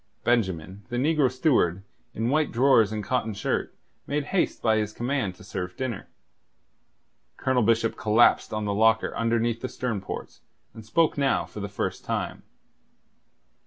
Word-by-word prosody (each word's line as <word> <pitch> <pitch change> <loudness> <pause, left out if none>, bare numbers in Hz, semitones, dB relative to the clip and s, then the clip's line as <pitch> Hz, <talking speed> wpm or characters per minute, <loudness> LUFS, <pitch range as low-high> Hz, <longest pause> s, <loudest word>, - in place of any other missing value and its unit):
Benjamin, 95 -6 0
the 120 - -4
negro 140 0 +2
steward, 125 - +2 0.3
in 115 +2 -1
white 155 +1 +2
drawers 115 -4 +4
and 105 -1 -3
cotton 110 -1 -1
shirt, - - -2 0.3
made 145 +1 -1
haste 190 - +1
by 110 -1 +2
his 105 -1 -1
command 120 -6 -2
to 105 - -15
serve 90 -2 -5
dinner. 120 -7 -4 1.3
Colonel 130 -2 +1
Bishop 115 0 +2
collapsed 110 +2 +3
on 110 0 -2
the 100 - -1
locker 110 +2 +3
under 115 0 +1
the 115 +2 -1
stern 115 -6 -3
ports, - - -7 0.3
and 110 - -10
spoke 155 +8 +1
now 140 -1 +2
for - - -10
the 100 0 -4
first 100 - -3
time. - - -3
115 Hz, 155 wpm, -26 LUFS, 105-130 Hz, 1.3 s, drawers